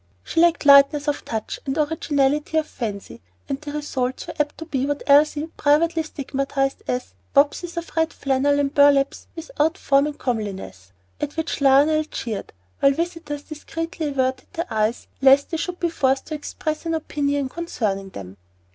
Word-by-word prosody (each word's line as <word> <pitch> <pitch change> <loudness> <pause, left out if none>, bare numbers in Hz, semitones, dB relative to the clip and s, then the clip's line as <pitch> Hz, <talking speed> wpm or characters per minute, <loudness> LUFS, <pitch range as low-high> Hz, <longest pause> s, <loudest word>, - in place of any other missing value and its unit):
She - - -2
lacked 340 -2 +3
lightness 280 +1 +6
of 295 - -1
touch 220 -2 -4
and 270 +2 -1
originality 300 -1 +1
of 315 - +2
fancy, 210 -8 -6 0.3
and 275 +1 -3
the 295 -1 -6
results 265 -4 -3
were - - -7
apt 295 0 0
to 320 - -7
be 275 -4 -1
what 290 0 -2
Elsie 295 +1 +4
privately 320 +3 +3
stigmatized 275 -2 -2
as 125 -8 -3 0.2
"wapses 315 +5 +2
of 340 - -6
red 325 0 +2
flannel 280 +1 +1
and 280 0 0
burlaps 285 -1 +3
without 325 0 -1
form 280 -3 +3
or 300 - -4
comeliness," 200 - -4 0.3
at 295 - -4
which 320 -2 -2
Lionel 285 +3 +5
jeered, 230 -8 -5 0.3
while 275 - +5
visitors 325 -2 -4
discreetly 325 +1 -5
averted 260 -2 -1
their 335 -6 -4
eyes 220 +2 0 0.2
lest 275 +1 +5
they 325 - -1
should 355 +1 -4
be 345 - +1
forced 270 -3 +1
to 310 - -6
express 310 +1 -4
an 330 - 0
opinion 285 -3 -1
concerning 215 - -3
them. 95 - -10
285 Hz, 165 wpm, -22 LUFS, 270-315 Hz, 0.3 s, lightness